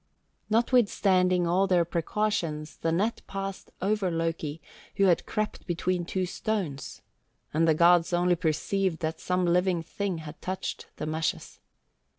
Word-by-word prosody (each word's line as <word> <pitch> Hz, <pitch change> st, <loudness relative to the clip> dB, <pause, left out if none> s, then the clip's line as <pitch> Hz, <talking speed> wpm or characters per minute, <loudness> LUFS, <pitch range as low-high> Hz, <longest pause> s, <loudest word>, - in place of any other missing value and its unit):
Notwithstanding 200 Hz, -6 st, +3 dB
all 185 Hz, +3 st, +2 dB
their 180 Hz, -3 st, +3 dB
precautions 170 Hz, -3 st, -2 dB
the 165 Hz, -, -1 dB
net 205 Hz, +8 st, 0 dB
passed 195 Hz, 0 st, -5 dB
over 200 Hz, -1 st, +1 dB
Loki, 165 Hz, -2 st, -2 dB, 0.4 s
who 200 Hz, -, +2 dB
had 180 Hz, -3 st, +3 dB
crept 215 Hz, 0 st, -3 dB
between 175 Hz, 0 st, -1 dB
two 185 Hz, +1 st, -1 dB
stones, 180 Hz, -7 st, -3 dB, 0.5 s
and 165 Hz, +2 st, +3 dB
the 160 Hz, -, +4 dB
gods 170 Hz, +1 st, +5 dB
only 175 Hz, 0 st, +3 dB
perceived 180 Hz, +2 st, 0 dB
that 160 Hz, 0 st, -2 dB
some 180 Hz, 0 st, 0 dB
living 175 Hz, 0 st, +2 dB
thing 190 Hz, +2 st, -3 dB
had 155 Hz, -1 st, -9 dB
touched 185 Hz, +1 st, -4 dB
the -, -, -4 dB
meshes. 155 Hz, +1 st, -3 dB
180 Hz, 140 wpm, -28 LUFS, 165-195 Hz, 0.5 s, gods